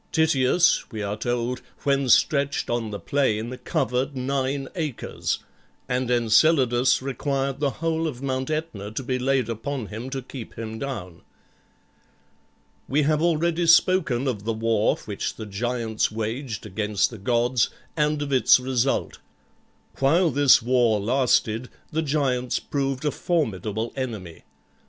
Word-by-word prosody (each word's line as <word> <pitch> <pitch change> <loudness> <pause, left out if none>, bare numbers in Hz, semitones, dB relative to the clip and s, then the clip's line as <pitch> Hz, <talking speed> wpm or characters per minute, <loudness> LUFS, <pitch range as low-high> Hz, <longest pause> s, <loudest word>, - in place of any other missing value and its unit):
Tityus, 160 +1 +3
we 110 -3 -4
are 100 +1 -2
told, 120 +2 -2 0.2
when 140 -2 +1
stretched 140 +1 +2
on 120 -2 -1
the 105 - -4
plain, 120 -3 0
covered 135 -3 -1
nine 135 +1 -1
acres, 155 -8 -3 0.5
and 125 0 -1
Enceladus 125 +1 +3
required 135 0 -2
the 145 -1 +1
whole 165 +2 -1
of 130 -6 -5
Mount 130 0 -2
Aetna 155 -11 -3
to 135 - -3
be 130 0 -1
laid 130 -2 +1
upon 120 +2 -4
him 110 +5 -7
to 135 -1 -4
keep 125 -2 -9
him 110 -1 -5
down. 100 -11 -6 1.7
We 145 +3 +2
have 150 +1 +2
already 170 +1 +1
spoken 165 -7 +4
of 110 -6 -2
the 115 +1 -1
war 110 -1 +1
which 105 -2 -4
the 110 - -7
giants 110 +2 -1
waged 110 +2 -4
against 105 +1 0
the 115 - -9
gods, 120 +3 +1 0.3
and 150 -1 +1
of 140 -1 -3
its 130 -1 +6
result. 130 +1 -1 0.8
While 160 +5 +3
this 140 -3 +5
war 120 -3 +3
lasted 120 0 +1 0.2
the 160 - 0
giants 135 -5 0
proved 135 -1 -2
a 150 - +2
formidable 110 - -2
enemy. 110 -11 -6
130 Hz, 135 wpm, -24 LUFS, 115-140 Hz, 1.7 s, its